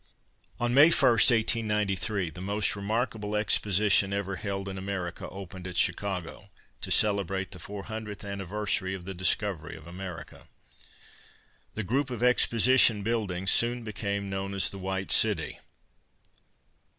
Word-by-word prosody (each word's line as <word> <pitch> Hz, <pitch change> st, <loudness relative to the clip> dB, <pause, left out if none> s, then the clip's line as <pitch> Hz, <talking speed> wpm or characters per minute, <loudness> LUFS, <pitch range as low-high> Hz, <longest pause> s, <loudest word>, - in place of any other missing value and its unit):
On 120 Hz, 0 st, 0 dB
May 145 Hz, +5 st, +7 dB
1, -, -, +3 dB
1893, 105 Hz, -5 st, +2 dB
the 90 Hz, -, -10 dB
most 100 Hz, +2 st, -1 dB
remarkable 105 Hz, 0 st, -2 dB
exposition 105 Hz, -1 st, +2 dB
ever 100 Hz, -1 st, -3 dB
held 100 Hz, 0 st, -4 dB
in 95 Hz, -, -5 dB
America 95 Hz, -2 st, -5 dB
opened 95 Hz, -1 st, -9 dB
at 90 Hz, -1 st, -6 dB
Chicago, 95 Hz, +1 st, -2 dB, 0.3 s
to -, -, -4 dB
celebrate 95 Hz, -3 st, +1 dB
the 90 Hz, -, -9 dB
four 100 Hz, +3 st, -7 dB
hundredth 110 Hz, -1 st, -7 dB
anniversary 100 Hz, 0 st, -3 dB
of 90 Hz, -2 st, -10 dB
the 95 Hz, -, -5 dB
discovery 90 Hz, -2 st, -1 dB
of 80 Hz, -2 st, -13 dB
America. 85 Hz, -2 st, -9 dB, 1.3 s
The 110 Hz, -, -2 dB
group 130 Hz, +7 st, -1 dB
of 120 Hz, -2 st, -4 dB
exposition 125 Hz, -2 st, +4 dB
buildings 100 Hz, -5 st, -1 dB
soon 120 Hz, +1 st, +3 dB
became 100 Hz, -1 st, -4 dB
known 95 Hz, 0 st, -4 dB
as 95 Hz, -2 st, +2 dB
"The 100 Hz, -, -8 dB
White 95 Hz, 0 st, -3 dB
City." -, -, +2 dB
100 Hz, 135 wpm, -28 LUFS, 95-110 Hz, 1.3 s, May